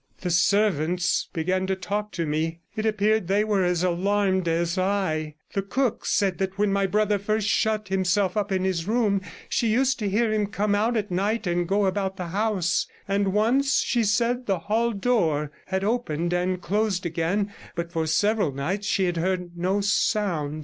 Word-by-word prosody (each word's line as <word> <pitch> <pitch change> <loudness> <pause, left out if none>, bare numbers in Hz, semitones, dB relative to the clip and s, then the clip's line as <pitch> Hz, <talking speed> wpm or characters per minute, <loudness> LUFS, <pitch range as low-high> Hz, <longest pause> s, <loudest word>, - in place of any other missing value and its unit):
The 180 - -2
servants 180 -1 +2
began 185 +2 -1
to 190 - 0
talk 210 +2 -3
to 170 - -2
me; 160 +2 -2
it 215 +1 -1
appeared 215 -2 +1
they 200 +3 +2
were 205 -3 +1
as 180 -1 +1
alarmed 190 +1 +1
as 170 +1 0
I; 185 -6 -1 0.2
the 195 - 0
cook 240 +5 -1
said 195 -3 +1
that 190 0 -2
when 205 -1 +2
my 200 0 +2
brother 210 +1 +1
first 215 +1 -1
shut 220 -1 +1
116 190 - +2
himself 185 0 +1
up 205 -1 -1
in 190 -1 0
his 185 -2 -1
room 215 -4 +2 0.3
she 235 - 0
used 260 +5 +2
to 210 -2 -1
hear 215 +2 +1
him 210 -1 +1
come 205 0 -1
out 225 +3 +1
at 210 -3 -2
night 205 +5 0
and 175 0 0
go 200 +2 +2
about 190 0 -1
the 180 -3 -5
house; 195 -3 0 0.2
and 200 0 +1
once, 255 +7 +2
she 240 -2 +1
said, 235 +4 +1
the 195 -2 +1
hall 220 +7 0
door 175 -10 0 0.2
had 190 0 -1
opened 175 -7 -1
and 180 +1 -1
closed 205 -2 0
again, 175 +5 -1 0.2
but 170 0 -4
for 165 -2 -1
several 200 +1 +2
nights 180 +10 -3
she 190 - +2
had 175 -1 -1
heard 180 0 -2
no 185 +4 0
sound. 190 -7 0
195 Hz, 190 wpm, -25 LUFS, 175-210 Hz, 0.3 s, servants